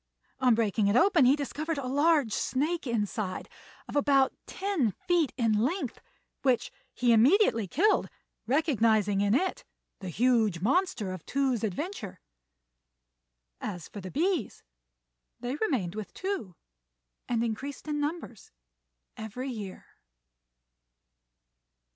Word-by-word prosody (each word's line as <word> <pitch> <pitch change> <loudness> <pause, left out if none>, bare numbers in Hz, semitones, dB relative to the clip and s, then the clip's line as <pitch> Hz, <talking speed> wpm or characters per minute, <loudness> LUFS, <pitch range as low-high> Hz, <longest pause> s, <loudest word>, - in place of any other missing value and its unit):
On 250 -3 +4
breaking 215 -2 +1
it 200 - +2
open 335 0 +5
he 260 +3 +6
discovered 300 +2 -3
a 275 - -3
large 285 -2 +2
snake 300 +4 -1
inside 210 -4 -2 0.4
of - - -8
about 275 -2 +3
ten 375 - 0
feet 350 -5 +1
in 230 -3 +2
length, 310 - -1 0.4
which 255 -3 +1 0.2
he 245 -1 +2
immediately 235 - +4
killed, 390 - +2 0.4
recognising 225 - +2
in 205 +2 +3
it 375 - 0 0.4
the 190 - -6
"huge 220 -2 +2
monster" 245 - +1
of 185 -3 -7
Tou's 265 -5 0
adventure. 220 - -4 1.4
As 175 -5 -5
for 205 - -8
the 185 - -7
bees, 330 - -1 0.8
they 245 +2 -3
remained 245 - -1
with 215 -1 -7
Tou, 370 - -4 0.7
and 235 -1 +1
increased 265 +6 -4
in 300 -1 -1
numbers 295 - -4 0.7
every 220 +5 -5
year. 205 -5 -7
250 Hz, 115 wpm, -29 LUFS, 215-300 Hz, 1.4 s, he